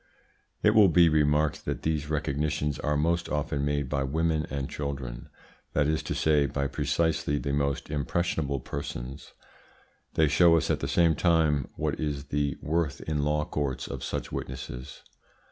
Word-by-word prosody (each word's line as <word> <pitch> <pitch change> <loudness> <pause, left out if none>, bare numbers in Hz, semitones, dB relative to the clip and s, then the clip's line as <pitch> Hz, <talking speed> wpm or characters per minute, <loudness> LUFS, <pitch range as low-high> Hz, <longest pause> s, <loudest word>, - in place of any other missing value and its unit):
It 105 - +6
will 105 -3 +7
be 85 -1 +5
remarked 75 0 +2
that - - -3
these 75 -2 -1
recognitions 75 0 -1
are 75 0 0
most 85 +3 0
often 75 -1 -1
made 70 -1 0
by 70 0 -1
women 80 +3 0
and 70 -1 -3
children 65 -4 -5 0.4
that 75 - +2
is 80 0 +1
to - - -4
say, 75 -2 +3
by 70 +1 -2
precisely 75 +1 0
the 70 -1 -2
most 70 -1 0
impressionable 70 -1 -1
persons. 70 0 -6 0.8
They 80 - +4
show 85 +3 +5
us 80 - 0
at - - 0
the - - -2
same 85 -2 +4
time 80 -5 +2
what - - -2
is 70 -2 -3
the 70 -1 0
worth 80 -3 -1
in 75 -2 -1
law 75 +1 +1
courts 70 -4 -2
of - - -6
such - - -4
witnesses. 65 -1 -6
75 Hz, 160 wpm, -28 LUFS, 70-80 Hz, 0.8 s, will